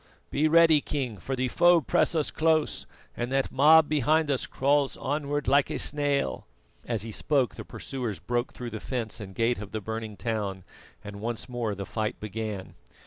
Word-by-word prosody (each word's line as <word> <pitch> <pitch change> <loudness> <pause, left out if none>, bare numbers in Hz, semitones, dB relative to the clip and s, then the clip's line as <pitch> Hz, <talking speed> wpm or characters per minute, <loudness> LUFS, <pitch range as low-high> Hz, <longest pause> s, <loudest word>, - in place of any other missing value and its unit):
Be 150 +2 +2
ready, 160 -1 +6
king, 130 -8 -3
for 135 +8 -4
the 130 0 0
foe 175 +7 +5
press 160 - +1
us 155 -2 0
close, 160 -1 +1 0.3
and 120 +1 -3
that 135 0 0
mob 155 +3 +6
behind 150 +1 +2
us 135 - -1
crawls 140 0 +1
onward 145 0 -2
like 140 +1 +4
a - - -2
snail." 145 -1 0 0.4
As 115 -4 -1
he 115 - -6
spoke 130 0 +1
the - - -8
pursuers 120 -7 -5
broke 120 +4 -2
through 120 -1 -7
the 110 - -5
fence 115 -3 -3
and 95 -3 -9
gate 115 0 +1
of 105 -1 -8
the 110 - -1
burning 110 0 -5
town, 105 -5 -3 0.4
and 100 -1 -8
once 120 +1 -3
more 120 -4 -2
the 100 0 -5
fight 110 0 -3
began. 105 -2 -5
125 Hz, 185 wpm, -27 LUFS, 110-145 Hz, 0.4 s, ready